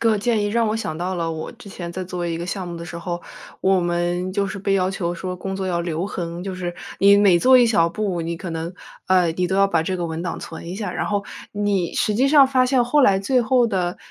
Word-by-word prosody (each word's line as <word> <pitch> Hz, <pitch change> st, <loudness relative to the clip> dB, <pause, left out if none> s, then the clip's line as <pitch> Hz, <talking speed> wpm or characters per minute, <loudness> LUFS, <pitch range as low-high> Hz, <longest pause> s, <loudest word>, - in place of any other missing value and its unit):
个 225 Hz, -2 st, +3 dB
建 225 Hz, -1 st, +1 dB
议 -, -, 0 dB
让 230 Hz, +1 st, +1 dB
我 215 Hz, -, 0 dB
想 160 Hz, -8 st, -4 dB
到 180 Hz, +2 st, -2 dB
了 165 Hz, -1 st, -2 dB
我 160 Hz, -1 st, -5 dB
之 230 Hz, -3 st, -14 dB
前 175 Hz, -3 st, -7 dB
在 185 Hz, -, -4 dB
做 180 Hz, -1 st, -4 dB
一 165 Hz, -1 st, -2 dB
个 170 Hz, -, -4 dB
项 185 Hz, -1 st, -4 dB
目 170 Hz, -, -6 dB
的 170 Hz, -, -7 dB
时 170 Hz, 0 st, -7 dB
候， 175 Hz, 0 st, -4 dB, 0.4 s
我 190 Hz, -1 st, +3 dB
们 175 Hz, +1 st, -1 dB
就 200 Hz, +1 st, 0 dB
是 195 Hz, +1 st, -5 dB
被 195 Hz, 0 st, 0 dB
要 185 Hz, -1 st, +1 dB
求 175 Hz, -3 st, -2 dB
说 180 Hz, +1 st, -5 dB
工 190 Hz, +1 st, -5 dB
作 190 Hz, -1 st, -3 dB
要 170 Hz, -1 st, 0 dB
留 170 Hz, +1 st, -2 dB
痕， 175 Hz, -3 st, -5 dB
就 190 Hz, -1 st, -4 dB
是 175 Hz, -1 st, -4 dB, 0.2 s
你 200 Hz, +1 st, +6 dB
每 195 Hz, -4 st, +5 dB
做 255 Hz, +7 st, +6 dB
一 245 Hz, -, +6 dB
小 170 Hz, -7 st, +3 dB
步， 190 Hz, -2 st, -2 dB
你 165 Hz, 0 st, -3 dB
可 175 Hz, -, -6 dB
能 165 Hz, +2 st, -4 dB, 0.3 s
呃， 180 Hz, -3 st, +3 dB
你 180 Hz, +2 st, -1 dB
都 190 Hz, -, -2 dB
要 195 Hz, 0 st, +4 dB
把 165 Hz, -4 st, +1 dB
这 185 Hz, +3 st, -2 dB
个 175 Hz, -1 st, -2 dB
文 160 Hz, 0 st, -4 dB
档 175 Hz, -, -4 dB
存 165 Hz, 0 st, -8 dB
一 180 Hz, -, -5 dB
下。 205 Hz, -3 st, -4 dB
然 -, -, -2 dB
后 205 Hz, -1 st, -1 dB, 0.3 s
你 205 Hz, -4 st, 0 dB
实 210 Hz, -, +1 dB
际 255 Hz, +5 st, +3 dB
上 285 Hz, -2 st, +7 dB
发 255 Hz, -1 st, +3 dB
现 250 Hz, -2 st, +3 dB
后 295 Hz, +5 st, +3 dB
来 195 Hz, -5 st, +5 dB
最 250 Hz, +5 st, +2 dB
后 245 Hz, 0 st, +3 dB
的 180 Hz, -3 st, -1 dB
185 Hz, 295 characters per minute, -22 LUFS, 175-205 Hz, 0.4 s, 上